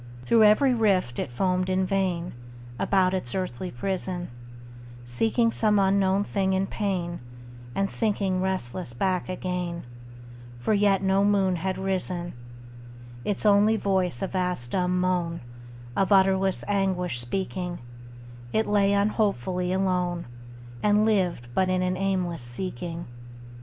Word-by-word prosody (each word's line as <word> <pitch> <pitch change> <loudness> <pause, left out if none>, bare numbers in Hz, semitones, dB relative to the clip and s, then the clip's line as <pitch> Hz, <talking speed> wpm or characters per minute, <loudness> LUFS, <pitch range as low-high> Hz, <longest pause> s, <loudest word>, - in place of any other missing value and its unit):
Through 225 - +5
every 250 +6 +5
rift 195 - +1
it - - -2
foamed 185 +8 0
in 185 0 +1
vain, 185 -3 -1 0.5
About 190 -2 +2
its 185 -11 -3
earthly 185 -3 -3
prison, 180 +4 -3 0.8
Seeking 225 - +1
some 215 -2 +2
unknown 195 0 +3
thing 195 -2 0
in 190 +1 +1
pain, 185 -4 -2 0.6
And 195 - +1
sinking 195 -4 0
restless 185 -7 -2
back 185 +6 0
again, 180 -2 -3 0.7
For 120 - 0
yet 200 -2 +3
no 195 +1 +3
moon 195 -3 +2
had 185 +2 -2
risen: 185 -2 -2 0.9
Its 205 +1 -1
only 210 +1 +5
voice 185 - 0
a - - 0
vast 180 -10 -2
dumb 180 -1 +1
moan, 180 -2 0 0.5
Of 195 +1 +1
utterless 190 -1 +3
anguish 185 -8 0
speaking, 180 +6 -3 0.7
It 220 - +1
lay 200 -1 +3
unhopefully 200 - 0
alone, 180 -2 0 0.6
And 210 +1 +3
lived 185 - +1
but 185 +5 +2
in 185 0 +1
an 185 0 0
aimless 185 -4 -1
seeking. 165 +6 -4
185 Hz, 125 wpm, -26 LUFS, 180-195 Hz, 0.9 s, Through